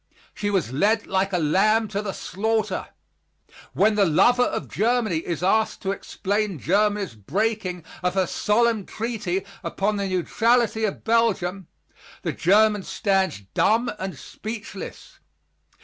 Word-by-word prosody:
She 205 - -2
was 190 - 0
led 210 +9 +2
like 190 +1 0
a 180 - +1
lamb 210 +8 +3
to 205 0 -2
the 205 -2 -3
slaughter. 215 +2 -2 0.9
When 215 +2 +3
the 205 -1 +3
lover 245 +10 +4
of - - 0
Germany 220 -4 +1
is 170 +1 -4
asked 220 +4 +1
to 195 - 0
explain 200 0 -2
Germany's 205 - +1
breaking 180 - -2 0.2
of 180 0 -1
her 190 -1 +3
solemn 220 +2 +1
treaty 210 -5 -3 0.2
upon 205 +2 -1
the 200 -1 -1
neutrality 225 +4 +2
of 205 - -4
Belgium, 195 -6 +1 0.6
the - - -1
German 210 +3 +4
stands 190 - 0
dumb 230 +3 +2
and 190 -5 -5
speechless. 220 - -8
205 Hz, 135 wpm, -24 LUFS, 185-220 Hz, 0.9 s, lover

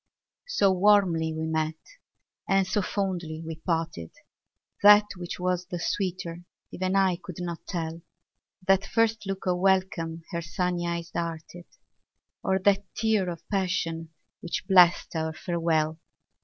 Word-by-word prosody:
So 200 - +3
warmly 185 -4 +3
we 160 0 -3
met 160 0 -1 0.7
and 195 0 +4
so 205 +2 0
fondly 175 -5 -3
we 160 -1 -6
parted, 165 - -2 0.7
That 205 +1 +8
which 175 -1 -6
was 180 0 -1
the 180 - -4
sweeter 175 -2 -2 0.3
even 185 +1 -1
I 190 -2 +3
could 180 -2 -9
not 170 -2 -5
tell, 165 -2 -4 0.6
That 195 +1 +4
first 220 -1 0
look 195 0 -4
of 180 -1 +1
welcome 185 -4 +1
her 170 - -2
sunny 175 +2 -2
eyes 170 0 -3
darted, 170 +1 -5 0.8
Or 190 -1 +2
that 200 +1 +3
tear 220 -5 +1
of 170 -2 -8
passion, 170 -4 -1 0.3
which 175 - -4
blest 180 -3 +5
our 160 0 -1
farewell. 160 -1 0
175 Hz, 135 wpm, -27 LUFS, 165-195 Hz, 0.8 s, That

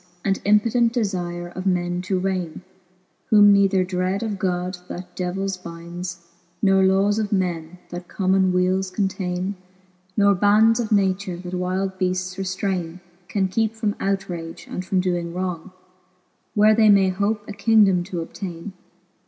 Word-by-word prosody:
And 195 0 0
impotent 230 +3 +3
defire 175 -6 -3
of 185 +1 -4
men 175 -1 0
to 190 - +2
raine! 185 -3 -2 0.7
Whom 205 -1 +7
neither 195 -1 +3
dread 185 +2 -1
of 210 -4 -3
God, 180 0 -2
that 180 0 -8
devills 190 +1 -2
bindes. 170 0 -8 0.3
Nor 195 0 +4
lawea 195 +2 +3
of 210 -2 -2
men, 180 -3 -2
that 175 0 -7
common 190 -1 +2
weales 185 +1 +1
containe. 185 -1 -2 0.6
Nor 200 -1 +5
bands 210 +4 +4
of 225 -2 -2
nature, 190 -2 +1
that 180 0 -8
wilde 185 +1 -2
beaftes 185 0 -1
reftraine, 185 -2 -3 0.3
Can 190 0 0
keepe 220 +3 0
from 215 -2 -1
outrage, 180 -4 -3
and 185 - -5
from 185 0 0
doing 175 -2 -2
wrong, 180 -1 -3 0.9
Where 215 +1 +6
they 215 -1 +5
may 195 -2 +5
hope 205 +3 -1
a 210 - -6
kingdome 205 -4 +4
to 175 -3 -4
obtaine. 175 +2 -7
190 Hz, 145 wpm, -22 LUFS, 180-200 Hz, 0.9 s, Whom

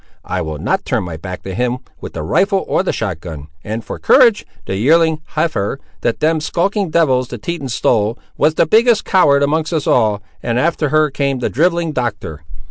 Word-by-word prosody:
I 95 - -2
will 80 -2 -4
not - - -1
turn - - -1
my 85 -2 -6
back 90 +3 -7
to 95 - -6
him, 125 +3 -1 0.2
with - - -8
the 80 - -5
rifle 195 - +1
or - - +1
the 190 - -1
shot 95 -7 -3
gun; 80 -3 -9
and 110 +2 -5
for - - -6
courage!—the 215 - +2
yearling 160 +8 +3
heifer, 150 -7 -1 0.2
that 115 - -1
them 160 0 +2
skulking 195 +4 -1
devils 130 -6 +2
the 125 - -7
Tetons 140 -1 -4
stole, 110 +1 +1 0.2
was 155 - +2
the - - +3
biggest 225 +5 +3
coward 145 -7 +4
among 155 +2 +1
us 160 -4 -1
all, 105 -4 +2 0.2
and 120 0 -1
after 155 0 0
her 155 0 +2
came 140 -1 -1
your 125 - -2
drivelling 170 +3 +1
Doctor. 110 - -4
140 Hz, 195 wpm, -17 LUFS, 105-165 Hz, 0.2 s, coward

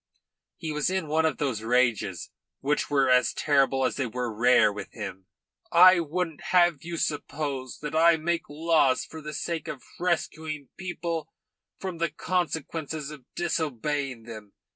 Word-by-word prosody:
He 160 -2 -4
was 150 +2 0
in 185 -4 -1
one 160 +2 +2
of 160 - -2
those 130 -7 -1
rages 115 -5 +1 0.3
which 145 +2 0
were 140 -2 +3
as 125 -1 +4
terrible 135 -2 +2
as - - -1
they 135 - 0
were 120 0 -3
rare 115 -2 +5
with 105 - -7
him. 95 -4 -7 0.4
"I 180 +1 +8
wouldn't 165 0 -3
have 175 -5 +4
you 170 0 -5
suppose 145 -4 -3
that 150 +1 -4
I 165 +1 +6
make 170 0 -2
laws 150 -4 +2
for 160 - -10
the 150 0 -6
sake 170 -2 -3
of 140 -4 -6 0.2
rescuing 160 -4 -2
people 170 -3 -4 0.5
from 185 -3 -5
the 170 0 +1
consequences 160 -4 -3
of 145 -5 -11
disobeying 145 -6 -2
them. 110 -3 -10
150 Hz, 155 wpm, -27 LUFS, 130-165 Hz, 0.5 s, I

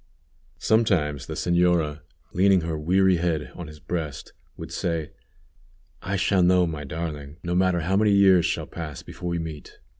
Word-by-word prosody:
Sometimes 90 - +1
the - - -5
señora, 85 -4 +1 0.3
leaning 95 0 +4
her 80 -1 -3
weary 90 +4 +3
head 85 -3 -1
on 90 -3 -8
his 75 0 -12
breast, 75 -4 -5 0.2
would - - -8
say: 80 -2 -2 0.9
"I 95 +2 -3
shall 95 0 +2
know 90 0 +4
my 80 -3 -5
darling, 75 -1 -6
no 90 0 -2
matter 90 -1 +2
how 95 +5 +1
many 105 +1 +3
years 95 -4 +5
shall - - -2
pass 75 -5 -7
before 90 - -7
we 85 - -1
meet." 80 -3 -7
85 Hz, 160 wpm, -25 LUFS, 75-95 Hz, 0.9 s, years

